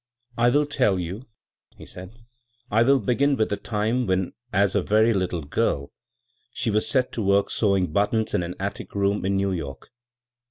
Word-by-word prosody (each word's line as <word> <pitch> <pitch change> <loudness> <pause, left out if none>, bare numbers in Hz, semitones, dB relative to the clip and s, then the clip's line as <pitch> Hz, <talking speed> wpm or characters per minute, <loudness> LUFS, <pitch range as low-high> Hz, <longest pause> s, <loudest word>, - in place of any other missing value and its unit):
" 120 0 -31
I - - +6
will 145 +4 +3
tell 130 -9 +1
you," 90 +8 -5 0.5
he - - -11
sEud. 90 0 -9 0.4
" 120 +1 -37
I 110 +2 +4
wiU 135 -3 +3
begin 140 +4 +2
with 110 -4 0
the 100 - 0
time 110 +4 -1
when 95 -1 0 0.2
as 100 -2 +2
a - - +2
very 110 +2 +3
little 90 -4 -1
girl 70 0 -1 0.6
she 115 - -2
was 105 +1 0
set 130 -3 +1
to 115 - -4
work 100 0 +2
sewing 95 -6 +1
buttons 105 +3 +1
in - - +2
an 85 +1 -5
atUc 100 +1 -5
rocun 100 +1 +1
in 100 0 +1
New 100 0 0
York." 75 -7 -6
100 Hz, 195 wpm, -24 LUFS, 95-120 Hz, 0.6 s, I